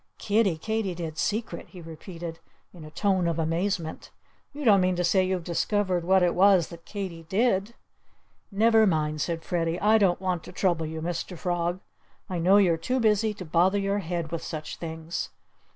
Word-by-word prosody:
"Kiddie 205 -5 +1
Katydid's 175 -5 -3
secret!" 215 +2 -2
he 185 - -12
repeated 165 0 -8 0.3
in 170 -3 -11
a 155 - -9
tone 185 +1 +1
of 165 -1 -1
amazement. 165 +1 -2 0.4
"You 290 0 -7
don't 200 -4 +6
mean 185 0 +2
to 180 - -1
say 185 +2 +3
you've 185 -1 -1
discovered 180 +1 0
what 190 +1 +4
it 175 - +3
was 190 -2 +4
that 170 -1 -12
Katy 190 -5 -5
did?" 210 0 +1 0.8
"Never 220 +2 +4
mind!" 155 -3 0
said 165 +1 -2
Freddie. 170 -1 -1
"I 215 +2 +4
don't 190 -4 +3
want 180 -3 -2
to - - -9
trouble 170 -4 0
you, 160 0 -5
Mr. 175 +1 -4
Frog. 175 +1 -1 0.5
I 180 - -1
know 185 +4 +5
you're 180 -5 +4
too 250 +11 -1
busy 220 -1 +2
to 185 - -8
bother 175 +5 +3
your 200 0 0
head 170 -3 -4
with 170 - -3
such 155 -2 -6
things." 160 0 -5
180 Hz, 180 wpm, -26 LUFS, 165-200 Hz, 0.8 s, don't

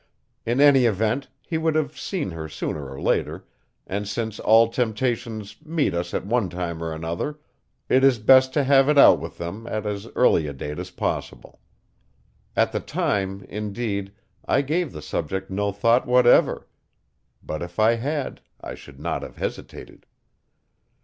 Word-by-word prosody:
In 120 +3 +1
any 140 -3 +6
event, 110 +5 0 0.2
he 160 -2 -2
would 160 -1 0
have 155 -5 0
seen 175 - -3
her 80 -1 -6
sooner 75 -2 -4
or 65 - -8
later, - - -1 0.4
and 100 +2 -4
since 110 +1 -4
all 115 +1 +5
temptations 115 -2 -2
meet 160 -2 0
us 85 0 -3
at - - -2
one 110 -2 0
time 85 -2 -4
or 80 -1 -3
another, 85 - -4 0.5
it 130 +1 +3
is 135 -3 +5
best 130 +4 +5
to 145 - +3
have 135 +1 +4
it 150 - +3
out - - +8
with - - -8
them 100 +7 -6
at 110 -2 -3
as 105 +1 -4
early 85 -10 +3
a 70 - -5
date 75 +2 -6
as - - -6
possible. - - -4 1.0
At - - +2
the - - -1
time, 95 -1 -2
indeed, 100 -1 -4 0.3
I 140 - +1
gave 160 +2 -1
the 75 - -9
subject 95 +5 -4
no 100 +1 -1
thought 115 +6 +2
whatever; 125 0 +4 0.8
but 75 - -5
if 85 0 -7
I 110 +1 +4
had 140 +3 -3 0.2
I - - -7
should 70 -1 -13
not 80 +1 -2
have - - -9
hesitated. - - -7
110 Hz, 165 wpm, -24 LUFS, 95-130 Hz, 1.0 s, out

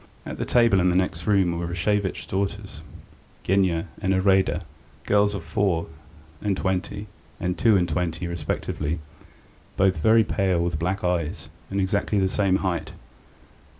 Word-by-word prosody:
At - - -6
the - - -1
table 115 -5 +4
in 90 0 +3
the 90 - +1
next 90 -2 -1
room 95 -5 +2
were 85 - -3
Rashevitch's 95 +1 -1
daughters, 95 -2 -3 0.6
Genya 95 -3 +2 0.2
and 95 -2 +1
Iraida, 95 -2 +2 0.4
girls 105 0 +3
of 95 - -5
four 85 0 0 0.5
and 100 -2 0
twenty 95 +2 -2 0.3
and 90 0 -1
two 110 -1 +4
and 90 -2 +1
twenty 85 -1 -2
respectively, 85 -2 -3 0.8
both 95 -2 +3
very 110 +8 +5
pale, 95 -4 0
with 85 -2 -1
black 95 +4 -1
eyes, 85 -2 -1 0.2
and 100 - -2
exactly 100 +2 0
the 95 -1 +2
same 95 -1 +2
height. 90 -2 -2
95 Hz, 150 wpm, -24 LUFS, 85-100 Hz, 0.8 s, very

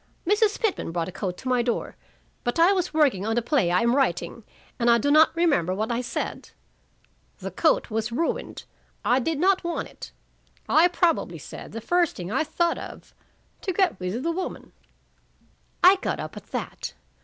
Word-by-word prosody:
Mrs. 415 +3 +2
Pitman 425 - -1
brought 170 0 -2
a - - -7
coat 180 -1 -4
to 260 - -8
my 250 -1 +2
door, 235 -1 -2 0.5
but 240 - -1
I 340 +4 +6
was 370 -2 -1
working 285 -12 +2
on 225 +2 -1
a - - +3
play 240 - +2
I 180 +1 +3
am 235 +2 +2
writing, 215 -5 0 0.4
and 240 0 +3
I 235 - +6
do 285 +5 +1
not 310 +2 +7
remember 285 - +2
what 220 +4 -2
I 235 +1 0
said. 245 - -4 0.9
The - - -6
coat - - +1
was 220 +1 -2
ruined. 325 +8 -2 0.4
I 245 +2 +4
did 315 +4 -1
not 380 +2 +3
want 340 0 -3
it. - - -11 0.6
I 330 +3 +5
probably 350 -1 0
said - - -10
the 225 - -6
first 350 +7 +1
thing 180 +1 -6
I 315 - +1
thought 335 +2 0
of - - -10 0.5
to 380 - -2
get 370 - +1
rid 180 +2 -3
of 250 - -4
the 335 - 0
woman." 370 +2 -5 1.1
I 375 +2 +8
got - - -3
up - - -6
at - - -10
that. - - -5
270 Hz, 190 wpm, -25 LUFS, 225-345 Hz, 1.1 s, I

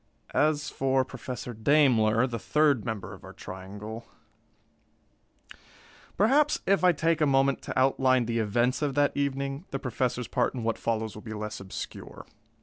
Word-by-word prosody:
As 150 0 +1
for 130 -1 +1
Professor 125 -2 -7
Daimler, 115 -2 +3
the 120 -3 -4
third 145 -3 +2
member 110 -4 -5
of - - -13
our - - -10
triangle 105 +5 -8 2.1
perhaps, 280 +9 +3
if 195 -2 +2
I 180 - +7
take 165 0 0
a 150 - +4
moment 135 0 +2
to - - -5
outline 130 -1 +3
the 115 0 -1
events 120 +5 +1
of 145 -3 -1
that 145 0 +3
evening, 140 +2 -2
the 135 - -3
Professor's 125 -2 -2
part - - 0
in 120 - -4
what 115 -1 -1
follows 110 -1 -2
will 105 - -10
be 110 -1 -7
less 105 0 -5
obscure. 95 -1 -8
130 Hz, 155 wpm, -28 LUFS, 110-145 Hz, 2.1 s, I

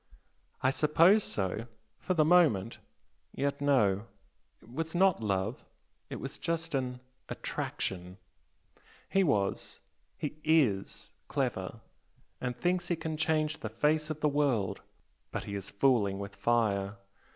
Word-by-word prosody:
"I 130 - +4
suppose 165 +9 +5
so 100 +4 -2 0.3
for 185 - -1
the 155 -2 +4
moment! 150 - +4 0.6
Yet 140 +1 -1
no, 110 -7 +3 0.5
it 115 - -17
was 160 +3 -3
not 185 -7 +4
love 100 +2 -1 0.5
it - - -5
was 135 +2 -6
just 165 -1 -2
an 125 -2 -2 0.3
'attraction' 90 0 -4 0.9
he 195 - +4
was 100 - 0 0.4
he 150 +1 -5
IS 140 -12 +2 0.2
clever, - - -2 0.6
and 125 -1 -2
thinks 180 +6 0
he 175 - +1
can 160 -1 -4
change 155 -1 0
the 110 - -4
face 150 +7 +1
of 155 -1 -4
the 150 - +4
world. 140 -9 +1 0.5
But - - -3
he 100 - -6
is 100 -2 -4
fooling 100 -4 +2
with 100 0 -6
fire! 100 -4 +1
135 Hz, 130 wpm, -31 LUFS, 100-155 Hz, 0.9 s, suppose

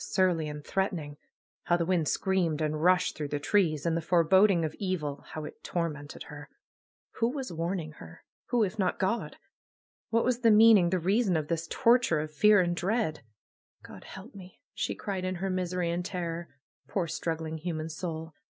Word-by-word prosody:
Surly 175 -5 +1
and 150 0 -8
threatening! 175 -7 -2 0.5
How 175 - +3
the 170 - -1
wind 170 -3 +1
screamed 175 -4 0
and 155 -1 -1
rushed 180 0 +3
through 150 -1 -4
the 145 0 -3
trees! 155 -2 +1
And 165 -1 +1
the 165 - 0
foreboding 175 +2 +4
of 155 - -4
evil, 155 -8 -3
how 155 -1 -5
it - - -11
tormented 150 -4 -4
her! 145 -2 -11 0.7
Who 230 0 +2
was 265 -7 -5
warning 165 -1 -3
her? 80 0 -12 0.2
Who, 240 -2 +2
if 210 +2 -3
not 185 -2 +1
God? 195 +5 -1 0.7
What 230 0 +2
was 250 -1 +1
the 230 -2 +4
meaning, 215 -4 +7
the 185 - +1
reason 190 +1 +2
of 150 -1 -3
this 165 -1 -2
tor 245 0 +4
ture 170 -10 0
of 155 0 -5
fear 210 +4 +5
and 175 -1 0
dread? 195 -3 -1 0.6
^^God - - -12
help 195 +7 -11
me 185 -2 -13
!'^ - - -73
she - - -2
cried 195 -3 -4
in 185 0 -2
her 190 +2 -2
misery 180 -1 -1
and 175 +1 -2
terror. 175 -3 -4 0.4
Poor, 190 -4 -1
struggling 160 -1 -3
human 160 -1 -3
soul! 160 0 -5
175 Hz, 190 wpm, -29 LUFS, 160-195 Hz, 0.7 s, meaning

